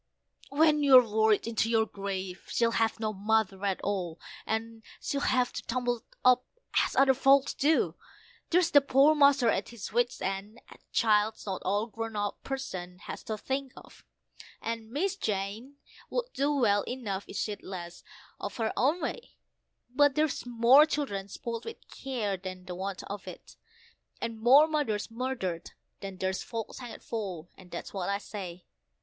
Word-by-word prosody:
When 300 +2 +4
you're 260 -4 +8
worried 220 -1 +3
into 225 -1 0
your 225 -1 +3
grave, 195 -3 -5
she'll 230 -1 +1
have 225 -1 +1
no 215 -1 -1
mother 205 -1 0
at 195 -2 0
all, 180 -5 -2 0.3
and'll 225 0 -3 0.4
have 250 -3 +2
to - - -4
tumble 245 -1 -1 0.2
up 250 0 +6 0.4
as - - -3
other 270 0 +6
folks 275 +1 +4
do. 275 - +2 0.6
There's 350 0 +3
the 285 - +7
poor 275 +2 +5
master 280 -4 +5
at - - 0
his 225 -3 -8
wits' 240 +1 +1
end 195 +4 -4
a - - -14
child's 215 -1 +2
not 190 -3 -3
all 205 +3 +1
a - - -6
grown 225 -1 -5 0.3
person 185 -10 -5
has 200 - -8
to 220 - -3
think 265 +3 -3
of - - -15 0.6
and 230 -1 -4
Miss 355 - -1
Jane 215 - -3 0.3
would - - -3
do 280 +2 +1
well 225 -8 +3
enough 210 -6 -3
if - - -9
she'd 210 -2 -3
less 175 -2 -8 0.4
of 205 - -5
her 225 -1 -1
own 300 +8 +2
way; 475 - -5 0.6
But 285 0 +4
there's 305 -4 0
more 245 +5 +6
children 235 -11 -2
spoilt 230 +3 -5
with 455 - -7
care 225 -8 -3
than 185 0 -8
the 180 - -6
want 190 +1 -4
of 205 0 -7
it, - - -10 0.6
and 230 -1 -4
more 265 +6 +8
mothers 290 -10 -1
murdered 225 -9 -3 0.3
than 195 -2 -7
there's 190 0 -1
folks 230 +1 -6
hanged 245 -3 -9
for, 185 -7 -5
and 185 -2 -16
that's 170 - -7
what 190 -2 -2
I 200 - +1
say. 185 -4 -8
225 Hz, 165 wpm, -29 LUFS, 200-265 Hz, 0.6 s, you're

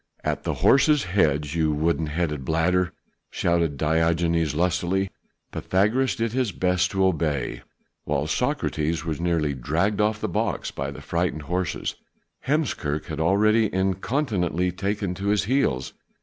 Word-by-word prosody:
"At - - -2
the - - -1
horses' 150 0 +4
heads, 75 -6 +1
you 80 -2 +1
wooden 80 +1 0
headed 75 -2 -2
bladder," 90 +4 +1 0.4
shouted 85 -4 0
Diogenes 80 0 +1
lustily. 90 +3 0 0.4
Pythagoras 110 +8 +1
did 115 -1 -1
his 125 -4 0
best 90 0 +1
to 95 0 +1
obey, 75 -7 -1 0.4
while 75 0 -1
Socrates 80 +1 -1
was 80 0 -3
nearly 80 -4 +1
dragged 85 - 0
off 105 0 +1
the 110 - -2
box 90 - -2
by 70 +1 -4
the 70 - -9
frightened 85 -3 -1
horses. 90 +4 -2 0.5
Heemskerk 100 - 0
had - - -5
already 105 +6 +3
incontinently 95 - 0
taken 100 +1 -2
to 95 +2 -5
his 105 0 +2
heels. 100 - 0
85 Hz, 135 wpm, -24 LUFS, 80-100 Hz, 0.5 s, horses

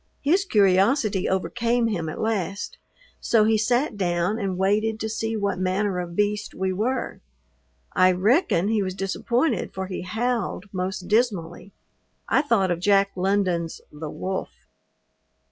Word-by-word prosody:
His 360 +8 +3
curiosity 200 - +3
overcame 235 +5 0
him 175 -8 -1
at - - -6
last, 200 -3 -2 0.4
so 225 -2 +3
he 220 +1 +3
sat 240 +3 +1
down 180 +3 0
and 195 -3 -2
waited 215 +3 +1
to 220 - -2
see 225 0 -2
what 200 -3 -1
manner 185 +1 0
of 175 -1 -5
beast 210 +1 -1
we 190 0 -1
were. 245 +7 -2 0.7
I 185 0 +5
reckon 195 - +2
he 220 -2 +2
was 185 -1 -3
disappointed 235 - -1
for 190 0 -3
he 185 0 -5
howled 220 +1 -2
most 185 0 -3
dismally. 200 -5 0 0.6
I 265 - +3
thought 225 -10 +2
of 175 - -1
Jack 195 +1 +3
London's 185 -3 0
"The 150 +1 -7
Wolf." 190 +5 -4
200 Hz, 145 wpm, -24 LUFS, 185-225 Hz, 0.7 s, I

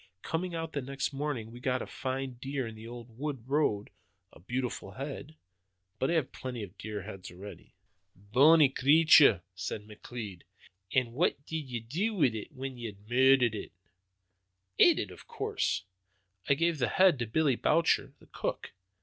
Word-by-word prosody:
Coming 175 +1 -2
out 165 -1 -4
the 140 - -1
next 135 +2 -3
morning 135 -6 -3
we 120 - -10
got 125 0 0
a - - -6
fine 130 -1 -4
deer 135 -2 -3
on 110 - -7
the 110 +1 -10
old 120 -1 -10
wood 140 -5 -4
road 135 -8 +1 0.4
a - - -15
beautiful 120 -1 -4
head. 140 +4 -7 0.6
But 130 - +1
I - - +1
have 155 -6 0
plenty 125 -4 -6
of 100 -1 -10
deer 105 -1 -6
heads 95 -2 -8
already." 95 +2 -11 0.4
"Bonny 135 - +5
creature!" 140 - +6
said 100 +3 -5
McLeod. 105 -3 -8 0.5
"An' 125 -3 +2
what 145 +1 0
did 155 -4 -4
ye 120 -2 -3
do 180 - -2
wi' 150 -10 +4
it, 110 -2 -6
when 135 -2 -6
ye 120 - -4
had 100 -1 -12
murdered 130 -1 +5
it?" 105 - -6 1.1
"Ate - - +7
it, - - -3
of - - -13
course. - - -1 0.7
I 140 - +5
gave 165 +1 +1
the 125 - +2
head 185 -3 +4
to 120 - -2
Billy 140 +3 +2
Boucher, 165 +7 +2
the - - -20
cook. - - -4
130 Hz, 175 wpm, -30 LUFS, 110-145 Hz, 1.1 s, Ate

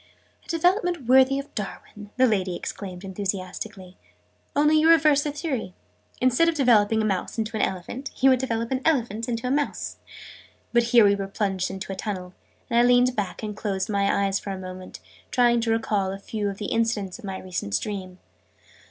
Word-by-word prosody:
"A - - -25
development 350 - +1
worthy 260 +2 +5
of 275 +1 -6
Darwin!", 210 0 -7
the 255 - +5
lady 190 -6 0
exclaimed 185 -1 -6
enthusiastically. 190 0 -5 0.6
"Only 300 +2 +4
you 320 +1 +4
reverse 305 -3 +5
his 295 0 -3
theory. 260 - -3 0.4
Instead 255 +7 +3
of 335 - -1
developing 220 -5 +4
a - - 0
mouse 195 +1 -2
into 220 0 -2
an 215 - 0
elephant, 215 +9 -3
you 265 +1 +6
would 255 - +3
develop 230 -2 -2
an 260 0 0
elephant 235 -7 0
into 230 +1 -3
a 250 - 0
mouse!" 290 +1 -2 0.8
But 235 0 +4
here 235 -3 +7
we 200 0 +4
plunged 195 -2 -1
into 190 0 -6
a - - -6
tunnel, 185 -2 -5 0.3
and 235 - +2
I - - +6
leaned 245 +1 +4
back 195 -1 -3
and 210 -1 -4
closed 200 -1 -2
my 200 0 +2
eyes 195 0 0
for - - -8
a 195 - -3
moment, 185 0 -9 0.3
trying 240 -1 +3
to 225 0 0
recall 210 -4 0
a 195 - -5
few 205 +1 -3
of 195 - -6
the 210 - -5
incidents 225 -3 -1
of 230 - -10
my 190 -1 -4
recent 140 - -2
dream. 190 -3 -6
220 Hz, 190 wpm, -25 LUFS, 195-255 Hz, 0.8 s, here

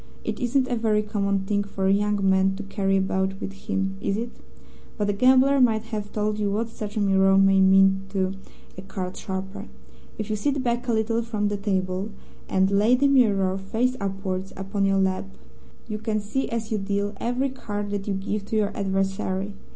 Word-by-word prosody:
It - - -3
isn't 255 +1 +1
a 245 - 0
very 215 -2 +1
common 200 -2 0
thing 205 +1 0
for 195 -1 -4
a 190 - +4
young 205 -1 +1
man 190 0 +3
to 205 - -6
carry 195 -1 0
about 190 0 0
with 195 - -5
him, 195 -1 -3
is 195 - 0
it? 235 +1 -3 0.7
But 205 -2 +1
a - - -2
gambler 260 +5 +5
might 220 -3 +3
have 210 -1 -3
told 210 0 -1
you 205 -1 +1
what 220 +3 -1
such 215 -1 -6
a - - +2
mirror 195 -1 +4
may 195 0 +5
mean 195 0 +5
to 190 -1 -1 0.5
a - - -6
card 190 -1 -5
sharper. 195 +2 -5 0.5
If 215 0 -4
you - - +1
sit 275 +5 -1
back 240 0 -1
a 235 - +1
little 225 +1 +1
from 215 -3 -1
the 205 - -1
table, 190 0 -1 0.4
and 190 +1 +2
lay 210 +5 +4
the 280 +3 +3
mirror, 205 -9 +3
face 230 +6 0
upwards, 195 -1 -3
upon 195 +1 -1
your 195 0 +2
lap, 190 0 +1 0.6
you 215 -1 -4
can 215 0 -1
see, 215 +6 -2
as 230 -2 -3
you 215 - +1
deal, 200 +1 -1
every 250 +5 -1
card 205 -5 -5
that 200 0 -3
you 200 - 0
give 200 +1 -3
to 220 - -4
your 210 -1 +1
adversary. 195 0 -1
205 Hz, 200 wpm, -25 LUFS, 195-220 Hz, 0.7 s, gambler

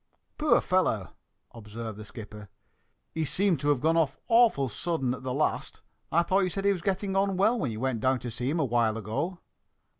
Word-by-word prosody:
"Poor 305 0 +4
fellow!" 115 - +1 0.4
observed 110 -1 -7
the 110 - -9
skipper. 105 -1 -10 0.6
"He 160 - -1
seems 180 +1 +1
to 145 - +1
have 140 -4 +2
gone 160 +2 +2
off 150 -4 +1
awfully 225 - +4
sudden 135 -1 -1
at 130 - -7
the 130 -1 -4
last. 145 +4 -2 0.3
I 170 +3 +4
thought 185 +3 +2
you 185 -2 +1
said 195 +2 -4
he 200 - +5
was 185 -3 -2
getting 195 +1 -1
on 195 -1 +1
well 220 +5 +3
when 145 - -1
you 110 -1 -5
went 130 -2 -1
down 130 +1 +2
to 120 - -5
see 120 +3 -3
him 165 +4 0
awhile 120 -5 +1
ago?" 140 - -3
145 Hz, 205 wpm, -28 LUFS, 115-185 Hz, 0.6 s, he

